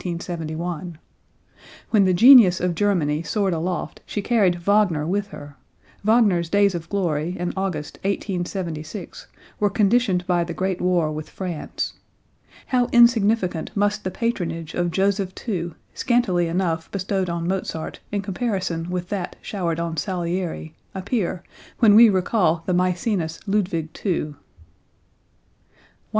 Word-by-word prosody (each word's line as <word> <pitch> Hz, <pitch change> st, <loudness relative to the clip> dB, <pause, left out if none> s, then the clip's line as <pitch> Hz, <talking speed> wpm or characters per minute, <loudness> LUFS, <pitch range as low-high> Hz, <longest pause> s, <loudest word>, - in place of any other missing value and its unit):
When 205 Hz, -4 st, +5 dB
the 185 Hz, -, +3 dB
genius 225 Hz, -5 st, +8 dB
of 180 Hz, -1 st, 0 dB
Germany 165 Hz, -5 st, +1 dB
soared 195 Hz, +1 st, 0 dB
aloft 175 Hz, +2 st, -3 dB
she 205 Hz, -, -3 dB
carried 205 Hz, -7 st, +3 dB
Wagner 175 Hz, -3 st, +2 dB
with 200 Hz, +4 st, -1 dB
her; 145 Hz, -7 st, -11 dB, 0.5 s
Wagner's 205 Hz, -6 st, +3 dB
days 200 Hz, 0 st, +3 dB
of 165 Hz, -1 st, -6 dB
glory 175 Hz, -3 st, -1 dB
in 175 Hz, 0 st, -3 dB
August, 185 Hz, -6 st, -3 dB
1876, 180 Hz, -3 st, -4 dB, 0.3 s
were 205 Hz, -, +3 dB
conditioned 200 Hz, -2 st, +2 dB
by 175 Hz, -1 st, +1 dB
the 170 Hz, -1 st, -6 dB
great 185 Hz, +1 st, -2 dB
war 175 Hz, -4 st, +1 dB
with 155 Hz, 0 st, -6 dB
France. 180 Hz, -5 st, -4 dB, 0.7 s
How 250 Hz, -2 st, +1 dB
insignificant 225 Hz, -7 st, +3 dB
must 205 Hz, +1 st, +1 dB
the 185 Hz, -, -2 dB
patronage 170 Hz, -7 st, -3 dB
of 175 Hz, 0 st, 0 dB
Joseph 190 Hz, +2 st, 0 dB
II, 175 Hz, -6 st, -2 dB, 0.2 s
scantily 195 Hz, -9 st, +1 dB
enough 165 Hz, -1 st, -1 dB
bestowed 190 Hz, -1 st, -2 dB
on 170 Hz, 0 st, -2 dB
Mozart 180 Hz, -4 st, -3 dB
in 205 Hz, -1 st, -2 dB
comparison 185 Hz, -5 st, -2 dB
with 180 Hz, -1 st, -3 dB
that 195 Hz, -4 st, -4 dB
showered 170 Hz, -5 st, -2 dB
on 165 Hz, -1 st, -3 dB
Salieri, 175 Hz, -1 st, -3 dB, 0.2 s
appear, 190 Hz, -2 st, -2 dB, 0.3 s
when 225 Hz, -4 st, +6 dB
we 225 Hz, +2 st, +9 dB
recall 180 Hz, -3 st, +1 dB
the 185 Hz, -, 0 dB
Maecenas 180 Hz, -1 st, 0 dB
Ludwig 190 Hz, -6 st, -1 dB
II. 195 Hz, -, +2 dB
109. 150 Hz, -2 st, -4 dB
185 Hz, 130 wpm, -23 LUFS, 170-205 Hz, 0.7 s, we